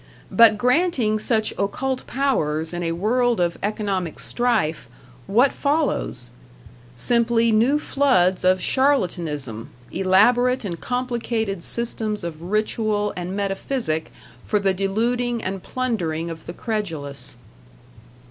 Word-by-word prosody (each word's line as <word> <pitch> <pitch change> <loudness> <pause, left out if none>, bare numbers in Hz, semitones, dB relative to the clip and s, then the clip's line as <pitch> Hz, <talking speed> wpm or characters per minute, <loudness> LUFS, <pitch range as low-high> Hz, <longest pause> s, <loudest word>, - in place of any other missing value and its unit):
But 230 -2 +6
granting 250 -3 +2
such 220 0 0
occult 260 +6 -2
powers 160 - -1
in 175 - -3
a 165 -1 -1
world 235 +6 +1
of 175 -1 0
economic 200 -5 -2
strife, 165 - 0 0.4
what 245 +7 +3
follows? 280 - -1 0.6
Simply 230 - +3
new 235 +7 +3
floods 255 -12 +2
of 185 0 +3
charlatanism, 165 - 0 0.2
elaborate 240 +6 +3
and 170 -4 -5
complicated 235 -6 -2
systems 220 -2 +1
of 165 -2 -6
ritual 210 +2 -1
and 180 +1 -4
metaphysic 195 -4 -2 0.3
for 210 - 0
the 195 -1 +1
deluding 235 +5 -1
and 190 0 -3
plundering 175 -10 -2
of 160 -1 -10
the 170 - -5
credulous. 165 -11 -4
210 Hz, 110 wpm, -22 LUFS, 175-245 Hz, 0.6 s, But